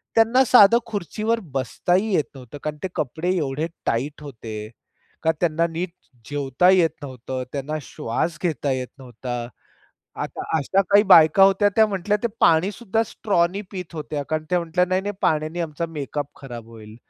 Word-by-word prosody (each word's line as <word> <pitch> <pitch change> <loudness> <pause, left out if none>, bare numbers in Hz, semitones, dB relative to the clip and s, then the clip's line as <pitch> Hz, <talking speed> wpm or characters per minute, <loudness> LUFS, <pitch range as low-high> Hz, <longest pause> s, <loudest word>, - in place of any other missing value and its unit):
त्यांना 230 +4 +5
साधं 230 -1 +7
खुर्चीवर 215 +3 -2
बसताही 180 - 0
येत 150 - +2
नव्हतं. 130 +2 -10
कारण 150 0 -3
ते - - 0
कपडे 165 +7 -1
एवढे 150 +1 -1 0.2
टाईट 140 +6 -2
होते 110 -5 -7 0.5
का 160 - +4
त्यांना 170 -1 +2
नीट 170 +2 -4
ज 130 - -34
जेवता 145 +4 +2
येत 180 -3 +5
नव्हतं, 130 -1 -5
त्यांना 145 +2 -3
श्वास 155 +7 -3
घेता 150 -5 0
येत 130 -1 -2
नव्हता. 120 -1 -6 0.7
आता - - -5 0.2
अशा 190 +7 +2
काही 205 +1 +6
बायका 165 +1 +7
होत्या 195 +1 +5
त्या 220 -1 +6
म्हटल्या, 200 +1 0
ते - - +3
पाणीसुद्धा 200 +6 +2
स्ट्रॉनी 195 -3 0
पीत 180 -4 -7
होत्या, 150 -2 -4
कारण 155 0 -1
त्या 180 -1 +2
म्हटल्या, 170 +2 +1
"नाही-नाही 190 +3 -1
पाण्याने 155 +2 0
आमचा 165 0 -3
मेकअप 145 -2 -4
खराब 120 -4 -9
होईल." 110 -1 -12
160 Hz, 160 wpm, -23 LUFS, 135-190 Hz, 0.7 s, साधं